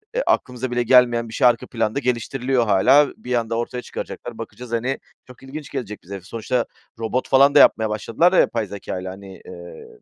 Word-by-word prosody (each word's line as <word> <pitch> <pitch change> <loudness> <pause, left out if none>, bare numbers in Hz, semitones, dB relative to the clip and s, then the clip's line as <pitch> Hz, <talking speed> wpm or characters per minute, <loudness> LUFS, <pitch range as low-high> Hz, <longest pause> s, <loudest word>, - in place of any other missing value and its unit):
eee, - - +1
aklımıza 125 0 -1
bile 120 0 0
gelmeyen 120 -1 +4
bir - - -10
şey 125 - +4
arka 120 -1 +1
planda 115 +2 -1
geliştiriliyor 125 0 -1
hâlâ, 125 +9 +5
bir 125 - -5
anda 115 -1 -1
ortaya 125 +1 -3
çıkaracaklar. - - -8
Bakacağız, 125 -1 -9
hani, 120 +4 -1 0.3
çok 125 +1 -15
ilginç 140 +1 -8
gelecek 105 -3 -6
bize 100 +3 -8
hepsi. 95 0 -11
Sonuçta 115 +2 -1 0.3
robot 115 +3 -2
falan 140 +2 +5
da - - +8
yapmaya 110 -5 +5
başladılar 115 - +1
ya - - +5
yapay 115 -4 +1
zekâyla 95 -1 -6
hani, 95 0 -12
eee, 85 -2 -11
120 Hz, 190 wpm, -21 LUFS, 110-130 Hz, 0.3 s, da